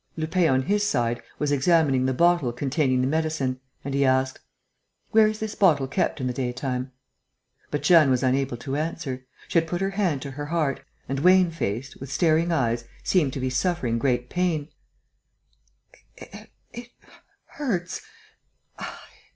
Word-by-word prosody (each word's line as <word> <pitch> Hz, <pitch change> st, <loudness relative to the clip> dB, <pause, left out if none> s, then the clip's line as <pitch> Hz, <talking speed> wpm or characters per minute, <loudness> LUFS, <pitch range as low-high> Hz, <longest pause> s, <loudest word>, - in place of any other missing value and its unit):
Lupin, 165 Hz, +2 st, +1 dB
on 130 Hz, 0 st, +3 dB
his 205 Hz, +7 st, +1 dB
side, 120 Hz, -, 0 dB, 0.2 s
was 150 Hz, -1 st, -1 dB
examining 140 Hz, -3 st, +3 dB
the -, -, +1 dB
bottle 170 Hz, -5 st, +3 dB
containing 130 Hz, +1 st, 0 dB
the 130 Hz, -, +1 dB
medicine; 155 Hz, -4 st, -1 dB, 0.3 s
and 140 Hz, -, -3 dB
he 140 Hz, 0 st, +2 dB
asked: 130 Hz, 0 st, +1 dB, 0.7 s
"Where 220 Hz, -1 st, +6 dB
is 215 Hz, 0 st, -2 dB
this 220 Hz, -1 st, -4 dB
bottle 155 Hz, -9 st, +3 dB
kept 155 Hz, +3 st, -1 dB
in 130 Hz, -, -2 dB
the 125 Hz, -, -1 dB
daytime?" 130 Hz, +1 st, -3 dB, 0.8 s
But 145 Hz, -, -3 dB
Jeanne 165 Hz, -6 st, +6 dB
was 130 Hz, 0 st, +2 dB
unable 130 Hz, -1 st, +1 dB
to 135 Hz, +3 st, -4 dB
answer. 145 Hz, -5 st, -4 dB, 0.2 s
She 170 Hz, -, +3 dB
had 165 Hz, -, -3 dB
put 175 Hz, +2 st, -2 dB
her 195 Hz, +1 st, -1 dB
hand 185 Hz, -9 st, 0 dB
to 140 Hz, -, -6 dB
her 145 Hz, +2 st, -6 dB
heart 155 Hz, -4 st, -1 dB, 0.3 s
and, 135 Hz, 0 st, -2 dB
wan 180 Hz, +2 st, +5 dB
faced, 130 Hz, -4 st, -4 dB
with 135 Hz, 0 st, -8 dB
staring 165 Hz, +3 st, +2 dB
eyes, 120 Hz, -6 st, 0 dB, 0.2 s
seemed 155 Hz, -8 st, +2 dB
to -, -, -4 dB
be 130 Hz, 0 st, -1 dB
suffering 130 Hz, -5 st, 0 dB
great 125 Hz, -1 st, 0 dB
pain: 165 Hz, -4 st, -1 dB, 1.5 s
"It 240 Hz, +1 st, -12 dB, 0.6 s
hurts 195 Hz, -12 st, -3 dB
145 Hz, 155 wpm, -25 LUFS, 130-170 Hz, 1.5 s, Where